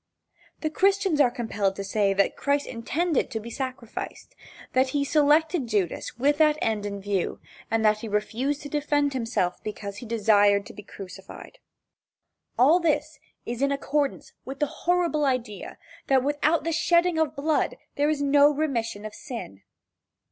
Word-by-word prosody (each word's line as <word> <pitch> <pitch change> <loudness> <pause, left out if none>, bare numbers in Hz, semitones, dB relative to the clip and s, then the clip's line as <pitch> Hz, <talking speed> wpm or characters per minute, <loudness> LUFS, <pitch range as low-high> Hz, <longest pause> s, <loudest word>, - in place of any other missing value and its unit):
The 310 - -1
Christians 385 -3 +2
are 255 - +5
compelled 215 -5 -2
to 200 - -5
say 195 0 +1
that 195 0 +1
Christ 285 0 0
intended 295 +7 -1
to 220 - -3
be 230 +2 -9
sacrificed 255 -3 -6 0.4
that 260 0 +3
he 280 - +1
selected 300 0 +3
Judas 205 -2 -2
with 290 +4 +2
that 305 -1 +4
end 215 -5 -1
in 200 0 -5
view, 195 -2 -2 0.3
and 225 -1 +1
that 215 0 +4
he 225 - -6
refused 235 +8 -1
to 290 - -7
defend 290 -1 0
himself 230 -8 -1
because 200 -1 -6
he 240 - -8
desired 205 -2 +3
to - - -11
be - - -10
crucified. 195 - -11 1.0
All 295 +8 +6
this 305 -2 0 0.3
is 240 +1 -4
in 280 0 +2
accordance 280 0 -1
with 270 +1 -7
the 295 - +1
horrible 340 0 0
idea 250 -7 -2 0.3
that 265 -2 +3
without 295 +3 +1
the 330 - -1
shedding 340 +1 +2
of 315 -1 0
blood 300 +2 0 0.2
there 290 0 +2
is 295 -2 0
no 285 +1 +6
remission 240 -8 -2
of 215 - -6
sin. 230 - -8
270 Hz, 160 wpm, -26 LUFS, 215-300 Hz, 1.0 s, All